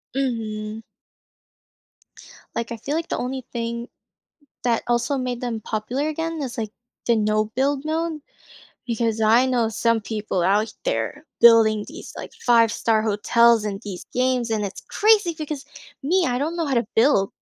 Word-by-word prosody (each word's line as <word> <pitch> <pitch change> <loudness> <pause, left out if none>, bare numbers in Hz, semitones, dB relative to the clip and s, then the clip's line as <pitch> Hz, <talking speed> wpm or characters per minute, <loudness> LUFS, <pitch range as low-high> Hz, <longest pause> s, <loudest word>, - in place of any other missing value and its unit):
Mhm. 220 -4 -2 1.7
Like 230 0 -3
I 235 - -4
feel 280 +7 -3
like 330 0 -2
the - - -1
only 255 0 -4
thing 235 0 -3 0.8
that 235 -2 +1
also 240 +3 +1
made 250 -2 -3
them 235 -3 -3
popular 240 +8 -2
again 325 0 -3
is, 260 -2 -5
like, 215 -2 -3 0.3
the 235 - +3
no 215 0 +2
build 270 +5 -1
mode, 320 -1 -2 0.6
because 230 -2 -1
I 230 +4 +5
know 245 -3 +1
some 225 0 +1
people 210 -3 -2
out 205 +5 +2
there 315 -11 -2
building 220 -2 +6
these, 330 +7 -9
like, - - -8
five-star 230 -2 +3
hotels 225 +2 +4
and 200 -2 -3
these 195 -4 -7
games 250 -2 +1
and 215 -2 0
it's 195 - -7
crazy 415 -6 +3
because 300 -2 -5 0.4
me, 355 +5 +2
I 245 -1 0
don't 315 +4 -1
know 335 -2 -1
how 275 - -1
to 235 -2 +2
build. 225 -5 +4
235 Hz, 160 wpm, -23 LUFS, 220-275 Hz, 1.7 s, building